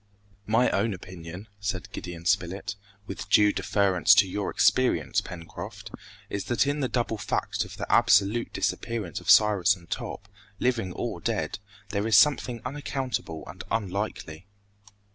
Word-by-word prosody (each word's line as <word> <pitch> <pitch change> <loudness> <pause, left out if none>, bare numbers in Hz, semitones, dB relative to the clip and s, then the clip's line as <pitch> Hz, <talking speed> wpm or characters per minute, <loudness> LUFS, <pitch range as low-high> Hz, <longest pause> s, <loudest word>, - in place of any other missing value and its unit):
"My 115 +3 +3
own 105 +1 0
opinion," 90 +2 -10
said 95 -2 -4
Gideon 85 -2 -7
Spilett, 95 0 0 0.3
"with 100 - -7
due 105 +1 +5
deference 95 -4 +3
to 100 - +5
your 100 +1 -3
experience, 95 - +2
Pencroft, 85 -2 -9 0.4
is 100 - -4
that 120 +3 +2
in 145 +1 -1
the 135 - 0
double 115 -3 -1
fact - - -1
of - - -11
the - - -3
absolute 100 +4 +3
disappearance 110 -8 -2
of - - -7
Cyrus 100 -2 +6
and 85 -2 -17
Top, 100 - -5 0.3
living 115 -6 0
or - - -4
dead, - - -2 0.3
there 100 +1 -1
is 110 - +5
something 130 -5 +3
unaccountable 130 - -4
and 85 +3 -9
unlikely." 100 -5 -3
100 Hz, 145 wpm, -27 LUFS, 90-115 Hz, 0.4 s, Cyrus